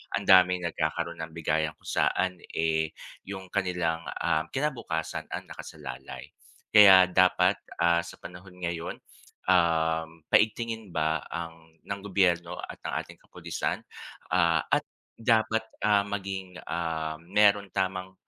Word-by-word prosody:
Ang -, -, -3 dB
daming 90 Hz, -1 st, +6 dB
nagkakaroon 85 Hz, +1 st, -2 dB
ng 80 Hz, -, -18 dB
bigayan 80 Hz, -1 st, -1 dB
kung -, -, -12 dB
saan 90 Hz, -1 st, +1 dB, 0.2 s
eh, 80 Hz, -1 st, 0 dB, 0.3 s
yung 95 Hz, -2 st, -7 dB
kanilang, 90 Hz, -4 st, -1 dB, 0.2 s
ah, 80 Hz, +2 st, 0 dB
kinabukasan 130 Hz, -, -3 dB
ang -, -, -4 dB
nakasalalay. 65 Hz, +1 st, -9 dB, 0.4 s
Kaya 95 Hz, -3 st, +9 dB
dapat, 95 Hz, 0 st, +4 dB, 0.2 s
ah, 85 Hz, 0 st, +4 dB
sa 85 Hz, -, -10 dB
panahon 90 Hz, +1 st, -11 dB
ngayon, 85 Hz, -2 st, -3 dB, 0.6 s
um, 80 Hz, -2 st, +1 dB
paigtingin 110 Hz, 0 st, +2 dB
ba 80 Hz, -1 st, 0 dB
ang 85 Hz, -1 st, -7 dB, 0.2 s
ng 100 Hz, 0 st, -5 dB
gobyerno 90 Hz, -3 st, +1 dB
at -, -, -8 dB
ng -, -, -4 dB
ating -, -, -14 dB
kapulisan, -, -, -4 dB, 0.5 s
ah, 85 Hz, -3 st, +3 dB
at -, -, +3 dB, 0.3 s
dapat, 110 Hz, -1 st, +2 dB, 0.2 s
ah, 105 Hz, -1 st, +4 dB
maging 95 Hz, -2 st, -5 dB
ah, 80 Hz, -2 st, -2 dB
meron 100 Hz, +1 st, +3 dB
tamang 95 Hz, -1 st, -2 dB
90 Hz, 125 wpm, -28 LUFS, 80-95 Hz, 0.6 s, Kaya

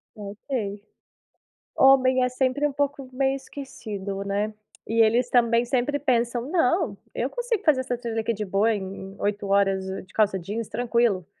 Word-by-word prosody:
Não 205 Hz, -1 st, -8 dB
sei. 205 Hz, -6 st, -3 dB, 0.9 s
Homem 260 Hz, -1 st, +5 dB
é 250 Hz, -, +2 dB
sempre 260 Hz, +3 st, +1 dB
um 280 Hz, -, -6 dB
pouco 280 Hz, -1 st, -2 dB
meio 270 Hz, +1 st, +1 dB
esquecido, 210 Hz, -8 st, -6 dB
né. 205 Hz, +2 st, -1 dB, 0.3 s
E 225 Hz, 0 st, +2 dB
eles 240 Hz, +3 st, +2 dB
também 235 Hz, -1 st, +3 dB
sempre 265 Hz, +3 st, 0 dB
pensam: 240 Hz, -1 st, 0 dB
"Não, 325 Hz, -, +1 dB, 0.2 s
eu 250 Hz, +3 st, -1 dB
consigo 470 Hz, -, -2 dB
fazer 285 Hz, -5 st, +4 dB
essa 250 Hz, -2 st, -3 dB
trilha 230 Hz, -2 st, -3 dB
aqui 230 Hz, +1 st, -1 dB
de 210 Hz, 0 st, -4 dB
boa 205 Hz, +4 st, +2 dB
em 195 Hz, -1 st, -6 dB
8 205 Hz, 0 st, -1 dB
horas 195 Hz, -1 st, +2 dB, 0.2 s
de -, -, -22 dB
calça 210 Hz, -3 st, +2 dB
jeans, 210 Hz, +5 st, -4 dB
tranquilo. 235 Hz, -7 st, +1 dB
235 Hz, 165 wpm, -25 LUFS, 205-265 Hz, 0.9 s, Homem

